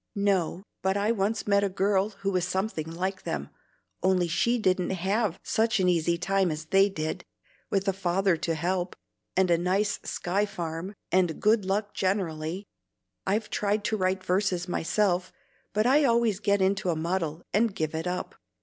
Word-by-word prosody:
"No, 195 Hz, -3 st, +1 dB, 0.2 s
but 190 Hz, +1 st, +1 dB
I 205 Hz, +2 st, +2 dB
once 215 Hz, 0 st, 0 dB
met 200 Hz, -1 st, +3 dB
a 200 Hz, -, +1 dB
girl 195 Hz, +1 st, +1 dB
who 195 Hz, -1 st, -3 dB
was 180 Hz, -2 st, 0 dB
something 190 Hz, -5 st, -2 dB
like 185 Hz, +3 st, -3 dB
them, 70 Hz, -2 st, -4 dB, 0.5 s
only 185 Hz, -1 st, +3 dB
she 235 Hz, +8 st, +2 dB
didn't 185 Hz, -5 st, +1 dB
have 190 Hz, +1 st, 0 dB
such 225 Hz, -1 st, +1 dB
an 185 Hz, -, +3 dB
easy 170 Hz, -1 st, +2 dB
time 195 Hz, +1 st, +1 dB
as 155 Hz, 0 st, -4 dB
they 195 Hz, +5 st, +4 dB
did, 155 Hz, -5 st, -3 dB, 0.5 s
with 195 Hz, 0 st, 0 dB
a 195 Hz, -, +3 dB
father 190 Hz, 0 st, +1 dB
to 165 Hz, 0 st, -2 dB
help, 180 Hz, +3 st, -1 dB, 0.4 s
and 185 Hz, -2 st, +3 dB
a 170 Hz, -, +4 dB
nice 190 Hz, +4 st, +1 dB
Sky 200 Hz, +4 st, -1 dB
farm, 175 Hz, 0 st, -5 dB, 0.2 s
and 180 Hz, -4 st, +2 dB
good 215 Hz, -1 st, +3 dB
luck 205 Hz, +2 st, -1 dB
generally. 185 Hz, -1 st, -1 dB, 0.6 s
I've 210 Hz, +2 st, 0 dB
tried 205 Hz, 0 st, 0 dB
to 220 Hz, -, 0 dB
write 185 Hz, -1 st, 0 dB
verses 185 Hz, -1 st, 0 dB
myself, 180 Hz, +1 st, 0 dB, 0.4 s
but 215 Hz, +1 st, +1 dB
I 280 Hz, +4 st, +5 dB
always 235 Hz, -5 st, +3 dB
get 200 Hz, -2 st, +2 dB
into 195 Hz, 0 st, +1 dB
a 170 Hz, -, +1 dB
muddle, 165 Hz, 0 st, -2 dB
and 215 Hz, -1 st, +2 dB
give 155 Hz, 0 st, -2 dB
it 160 Hz, +2 st, -3 dB
up. 180 Hz, 0 st, -3 dB
190 Hz, 175 wpm, -27 LUFS, 175-205 Hz, 0.6 s, I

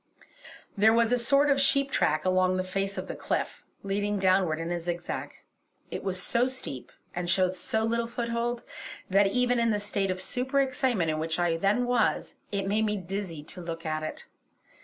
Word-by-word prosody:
There 220 Hz, +2 st, +5 dB
was 230 Hz, 0 st, +3 dB
a 245 Hz, -, +4 dB
sort 280 Hz, +4 st, +4 dB
of 275 Hz, 0 st, +3 dB
sheep 275 Hz, 0 st, +3 dB
track 155 Hz, -, +1 dB
along 185 Hz, 0 st, +3 dB
the 185 Hz, -, 0 dB
face 195 Hz, +2 st, -2 dB
of -, -, -4 dB
the -, -, -5 dB
cliff, -, -, -3 dB, 0.2 s
leading 205 Hz, +1 st, -1 dB
downward 185 Hz, -4 st, +3 dB
in 165 Hz, +1 st, -3 dB
a 175 Hz, -, -1 dB
zigzag. 175 Hz, +1 st, -4 dB, 0.6 s
It -, -, -4 dB
was 185 Hz, -1 st, -2 dB
so 235 Hz, +6 st, +1 dB
steep, 255 Hz, -, -5 dB, 0.2 s
and 175 Hz, 0 st, -2 dB
showed 185 Hz, 0 st, +3 dB
so 220 Hz, +5 st, -1 dB
little 230 Hz, +1 st, 0 dB
foothold, 235 Hz, 0 st, -2 dB, 0.5 s
that 195 Hz, +1 st, +5 dB
even 245 Hz, +3 st, +2 dB
in 230 Hz, 0 st, +3 dB
the 210 Hz, -, +2 dB
state 205 Hz, -1 st, -1 dB
of 185 Hz, 0 st, -1 dB
super 255 Hz, +8 st, 0 dB
excitement 255 Hz, -, +1 dB
in 155 Hz, -, -2 dB
which 160 Hz, 0 st, -1 dB
I 175 Hz, -2 st, +2 dB
then 200 Hz, +8 st, +2 dB
was, 245 Hz, -2 st, +1 dB, 0.2 s
it 200 Hz, -1 st, -1 dB
made 215 Hz, +2 st, +2 dB
me 210 Hz, -1 st, 0 dB
dizzy 185 Hz, -4 st, -5 dB
to 180 Hz, +4 st, -7 dB
look 165 Hz, -1 st, -6 dB
at 155 Hz, 0 st, -1 dB
it. 155 Hz, -, -6 dB
195 Hz, 195 wpm, -28 LUFS, 175-235 Hz, 0.6 s, There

